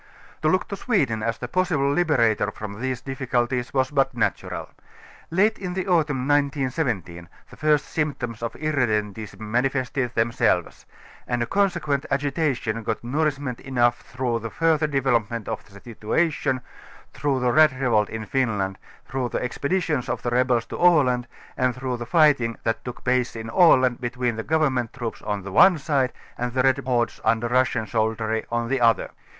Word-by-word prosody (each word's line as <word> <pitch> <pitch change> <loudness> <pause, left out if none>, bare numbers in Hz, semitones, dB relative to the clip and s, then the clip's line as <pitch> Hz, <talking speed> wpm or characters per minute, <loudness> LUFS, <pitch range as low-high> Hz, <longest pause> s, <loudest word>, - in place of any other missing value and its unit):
To 155 - +1
look 185 +4 +1
to 200 - -3
Sweden, 140 - 0
as 115 +1 -1
the 120 - -5
possible 160 -2 +1
liberator 115 -11 +2
from 105 +1 -8
these 130 -1 -2
difficulties, 125 -2 -1
was 130 0 +1
but 135 -3 +1
natural. 115 - -2 0.6
Late 205 +6 +2
in 180 -2 -4
the 190 0 -2
autumn 150 -7 +1
1917 130 - -1 0.2
the - - -12
first 150 -1 +2
symptoms 135 -8 -3
of 115 - -3
irredentism 110 -9 -1
manifested 125 +2 -1
themselves; 115 +1 0 0.4
and 120 -1 0
a - - -1
consequent 170 -4 0
agitation 135 -5 -1
got 115 +1 -3
nourishment 140 -1 -1
enough 120 -3 +1
through 125 -2 -2
the 115 0 -5
19 - - -20
further 160 -2 +2
flevelopement 120 -5 0
of 110 - -4
the 100 -1 -15
situation, 130 +5 -1 0.5
through 140 -3 0
the 125 -1 +1
red 155 +2 +6
re 135 - -1
volt 105 -3 +2
in 110 -1 -5
Finland, 105 -5 -1 0.3
through 130 -1 -2
the - - -2
ex])editions 145 +2 -1
of - - -3
the 120 - -1
rebels 125 -1 +2
to - - -7
Aland 130 -9 +4 0.3
and 125 -1 +1
through 125 -1 -3
the 120 -1 -7
fighting 140 -7 +3
that 115 0 -1
took 125 -1 -8
place 125 -1 +1
in 110 0 -6
Aland 130 -8 +5
between 125 -1 -1
the 110 - -4
govemmenl; 135 -7 +1
troops, 120 -4 -5
on 105 -2 -3
one 185 - +7
side, 140 -4 0 0.3
and 120 0 -2
the 130 0 +2
red 135 +1 +3
hordes 120 -2 0
under 115 +1 +2
Russian 125 -2 +1
soldiery, 110 +1 -1
on 120 0 -1
the 135 +1 0
other. 115 -3 +3
125 Hz, 165 wpm, -24 LUFS, 115-145 Hz, 0.6 s, one